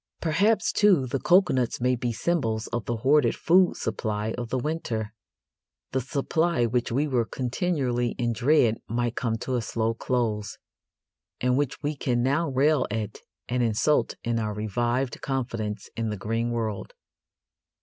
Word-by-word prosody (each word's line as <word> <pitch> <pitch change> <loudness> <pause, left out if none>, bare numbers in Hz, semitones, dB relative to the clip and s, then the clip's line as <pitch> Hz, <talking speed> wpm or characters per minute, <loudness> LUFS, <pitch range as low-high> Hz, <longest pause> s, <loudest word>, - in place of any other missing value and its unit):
Perhaps, 195 +8 +2
too, 190 -10 +4
the 130 +2 -2
coconuts 175 -10 +3
may 125 +1 +2
be 120 0 -2
symbols 115 -5 -1
of 120 -2 -4
the 120 - -1
hoarded 140 -3 +4
food 180 +2 +3
supply 110 0 -2
of 120 -2 -5
the 130 - 0
winter 120 -7 -3 0.8
the 130 - 0
supply 150 +2 0
which 120 +1 0
we 140 +6 +1
were 125 -4 +1
continually 125 -1 -1
in 120 -2 0
dread 120 -2 +3
might 120 +1 -1
come 115 -2 -1
to 125 +2 -3
a 120 - 0
slow 115 0 -1
close, 110 -3 -2 0.8
and 125 0 +2
which 140 0 -1
we 150 +1 -1
can 120 -3 0
now 140 +5 +1
rail 140 +3 +2
at 105 0 -4 0.3
and 125 +1 0
insult 120 +6 +2
in 115 0 0
our 105 -2 -2
revived 120 +4 -1
confidence 115 -6 -3
in 115 -1 -2
the 105 - -3
green 115 +4 -1
world. 110 -4 -3
120 Hz, 155 wpm, -26 LUFS, 115-140 Hz, 0.8 s, too